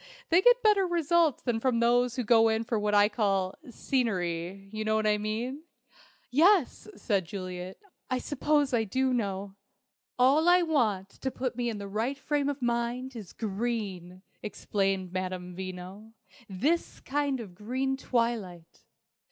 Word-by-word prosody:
They 345 +2 +5
get - - +5
better 410 -3 +4
results 340 -3 +2
than 240 -3 0
from 245 -1 +1
those 240 +1 +3
who 250 - -1
go 225 0 +5
in 220 0 0
for 230 -1 -1
what 210 0 +1
I 205 0 +6
call 195 -4 0 0.2
'scenery'. 195 -7 -2
You 215 0 -3
know 215 0 +1
what 220 0 +1
I 210 0 +2
mean?" 230 +7 -3 0.7
"Yes," 335 +5 +3
said 200 -6 0
Juliet, 185 -1 -6 0.3
"I 255 - +1
suppose 290 +1 0
I 230 -2 +3
do 260 +5 0
know." 200 -4 -3 0.6
"All 280 +7 +4
I 355 0 +5
want 220 - +1
to 265 - -5
put 255 -1 -3
me 240 0 -1
in 220 - -4
the 200 -1 -6
right 225 +7 -2
frame 285 0 -1
of 280 -2 -4
mind 240 +2 -1
is 210 -6 -8
green," 195 -4 -4 0.2
explained 195 -3 -2
Madame 185 -1 -4
Veno, 190 +4 -8 0.4
"this 285 - -1
kind 285 -1 -1
of 205 -6 -8
green 255 +7 -2
twilight." 230 -10 -2
230 Hz, 155 wpm, -29 LUFS, 195-265 Hz, 0.7 s, I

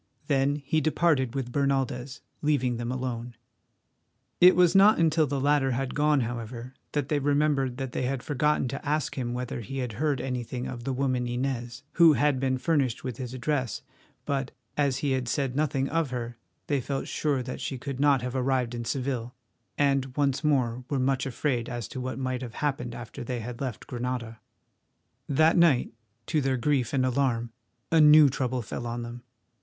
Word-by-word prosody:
Then 140 0 +2
he 155 +3 +1
departed 150 -5 +1
with 130 -3 -3
Bernaldez, 135 -1 -1 0.2
leaving 130 -5 +1
them 120 +1 -3
alone. 125 -2 -4 1.0
It 180 +1 +8
was 180 -2 +5
not 200 +2 +7
until 160 -2 +3
the 140 0 -1
latter 140 -1 +2
had 130 +1 -2
gone, 150 -1 +3
however, 120 +1 -5 0.2
that 145 -2 -1
they 150 - +2
remembered 140 -3 +1
that 135 -2 -4
they - - -2
had 130 0 -2
forgotten 150 -1 +1
to 135 - -5
ask 150 -1 -1
him 120 -2 -3
whether 125 -1 -4
he 135 +5 -6
had 125 -4 -3
heard 150 -4 +1
anything 125 -1 -3
of 120 -2 -6
the 135 - -1
woman 130 -2 0
Inez, 120 0 -3
who 165 -3 +6
had 145 -2 +2
been 130 -1 +1
furnished 135 -4 0
with 125 -4 -4
his 125 -1 -6
address, 130 -3 -2 0.4
but, 135 -2 -1 0.3
as 140 -3 +1
he 140 - +1
had 130 -2 0
said 130 +1 -1
nothing 140 -2 0
of 165 -2 0
her, 120 -1 -4 0.3
they 140 -3 0
felt 135 +2 -3
sure 140 -4 0
that 125 - -6
she 135 - -3
could 135 +1 -6
not 140 -3 +3
have 125 +1 -4
arrived 130 -2 0
in 120 -1 -4
Seville, 125 -2 -3 0.4
and 135 -2 +1
once 140 0 +1
more 125 -5 +1
were 145 - 0
much 135 +1 +1
afraid 125 -2 -1
as 120 -3 -4
to 130 - -5
what 130 -1 -4
might 130 -1 -2
have 120 -3 -7
happened 130 -5 -2
after 120 0 -8
they 125 0 -3
had 120 +2 -7
left 130 -5 -4
Granada. 120 -2 -4 0.9
That 155 +5 +4
night, 165 -8 +4 0.3
to 155 -2 +1
their 135 -1 +1
grief 130 -1 +1
and 130 -2 +1
alarm, 120 -3 0 0.4
a 165 -1 +5
new 150 -1 +8
trouble 130 -1 -2
fell 120 +3 -5
on 120 0 -3
them. 120 +1 -8
130 Hz, 185 wpm, -27 LUFS, 125-145 Hz, 1.0 s, It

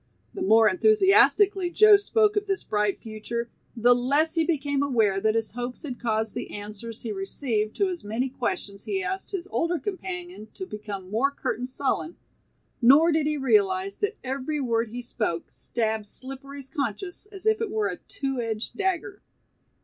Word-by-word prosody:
The 390 - -6
more 225 -11 +6
enthusiastically 400 - +4
Joe 425 +4 +7
spoke 420 +1 +2
of 415 0 0
this 390 -2 -1
bright 210 -1 0
future, 230 +2 -5 0.3
the 240 +2 +6
less 280 +6 +1
he 325 -1 +2
became 285 -4 0
aware 220 -8 +2
that 215 +1 +2
his 225 -1 -1
hopes 245 +3 -5
had 260 -5 -6
caused 220 -2 -1
the - - -5
answers 210 +2 -7
he 225 - -3
received 215 +2 -2
to 400 - +2
his 365 -2 -3
many 225 +5 -1
questions 220 -6 -4
he 385 -1 -1
asked 380 0 -3
his 385 -2 -4
older 340 +1 +1
companion 360 - -6
to 375 - -5
become 205 - -7
more 240 +6 +2
curt 280 - -3
and 250 +1 -3
sullen, 285 +5 -2 0.6
nor 285 +8 +7
did 310 -1 +1
he 300 0 0
realize 380 +6 +2
that 425 +1 -1
every 270 +3 -2
word 230 -3 0
he 245 +2 -6
spoke 210 -8 -3
stabbed 220 -2 -2
Slippery's 270 +3 -8
conscience 335 - -4
as 400 -1 -11
if 440 +1 +3
it 450 - -1
were 430 +1 0
a - - -4
two 270 -9 -4
edged 225 -1 -3
dagger. 385 0 -2
275 Hz, 175 wpm, -26 LUFS, 225-375 Hz, 0.6 s, Joe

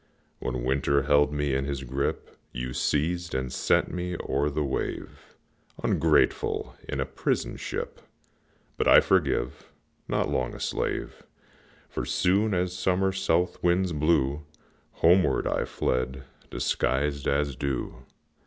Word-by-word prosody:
When 60 -1 -3
Winter 70 +2 +2
held 75 +1 +4
me 75 -2 -1
in 65 +1 0
his 70 -1 -3
grip, 65 +2 -3 0.2
You 60 0 -4
seized 85 +4 0
and 65 -1 -2
sent - - +1
me 90 -1 -3
o'er 70 +2 +1
the 75 +1 -1
wave, 65 -2 -4 0.5
Ungrateful! - - +2
in 65 - -2
a 65 - +1
prison 65 +1 -2
ship; - - -5 0.8
But - - +1
I - - +9
forgive, 70 -8 0 0.4
not - - 0
long 65 -2 -1
a - - -9
slave, - - -3 0.7
For, - - -4
soon 100 +3 +2
as 90 0 -1
summer 95 +1 +1
south 90 -2 0
winds 90 0 +2
blew, 75 -2 +1 0.5
Homeward 90 +3 +3
I - - 0
fled, 65 +1 -2 0.3
disguised 70 +2 0
as 70 -1 +1
dew. 70 -2 -3
70 Hz, 130 wpm, -27 LUFS, 65-90 Hz, 0.8 s, I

